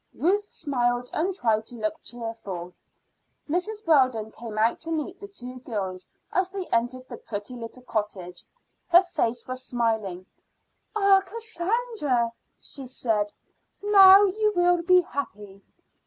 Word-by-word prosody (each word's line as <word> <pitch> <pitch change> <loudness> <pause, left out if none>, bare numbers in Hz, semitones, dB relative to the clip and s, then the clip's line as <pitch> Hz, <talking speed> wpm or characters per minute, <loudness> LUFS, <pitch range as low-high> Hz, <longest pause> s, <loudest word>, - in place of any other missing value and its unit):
Ruth 400 +5 +2
smiled 245 -3 -1
and 355 +5 0
tried 220 - +1
to 245 - -10
look 320 +6 -3
cheerful. 215 -7 -6 0.7
Mrs. 415 +7 -2
Weldon 255 -8 +3
came 225 -2 -8
out 225 +2 +2
to 330 - -5
meet 325 +4 -3
the 405 - -8
two 255 -10 -8
girls 190 -7 -5 0.2
as 370 0 +1
they 380 -1 -5
entered 250 +2 0
the 240 - -8
pretty 205 +3 -6
little 240 +1 -9
cottage. 195 -6 -4 0.4
Her 355 +1 +7
face 245 -9 -2
was 255 0 -5
smiling. 220 -7 -1 0.7
"Ah, 395 -2 +5
Cassandra!" 420 - -1 0.3
she 270 -2 -8
said, 220 -5 -1 0.5
"now 395 -1 +9
you 425 +2 +2
will 350 0 +3
be 365 +1 +5
happy." 205 - -6
255 Hz, 135 wpm, -26 LUFS, 225-365 Hz, 0.7 s, now